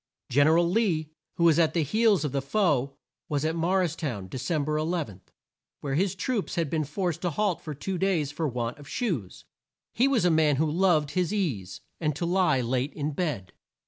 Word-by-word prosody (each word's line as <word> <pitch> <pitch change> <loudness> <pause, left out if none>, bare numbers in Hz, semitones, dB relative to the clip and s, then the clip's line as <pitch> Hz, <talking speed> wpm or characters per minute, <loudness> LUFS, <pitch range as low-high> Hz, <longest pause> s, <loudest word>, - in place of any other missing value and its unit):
Gen 145 +4 +5
er 160 +1 +5
al 170 0 +3
Lee, 170 -6 0 0.2
who 170 - 0
was 165 -1 +5
at 160 -1 +2
the 165 - +2
heels 210 - +2
of 145 - -2
the 140 0 -1
foe, 140 -4 0 0.3
was 145 0 0
at 160 +1 0
Mor 180 +3 +2
ris 170 -3 -1
town, 120 - -4
De 130 - -6
cem 150 +1 -1
ber 150 +1 -1
11, 155 - -2 0.6
where 140 -2 -3
his 190 +5 +1
troops 215 +2 -2
had 165 -4 -1
been 155 -1 +1
forced 170 +3 -2
to 180 - 0
halt 190 +2 0
for 155 -2 -6
two 180 +6 -4
days 175 -7 +1
for 155 +1 -2
want 120 +1 -3
of 145 - -12
shoes. 160 - -3 0.5
He 250 +4 +3
was 255 -9 +2
a 175 - +4
man 155 -2 +3
who 155 +4 +1
loved 160 -4 +2
his 180 +2 0
ease, 130 - -2 0.2
and 150 -3 0
to 170 - -2
lie 180 -6 +2
late 130 +3 -1
in 150 0 -2
bed. 140 - -3
155 Hz, 215 wpm, -27 LUFS, 140-180 Hz, 0.6 s, Gen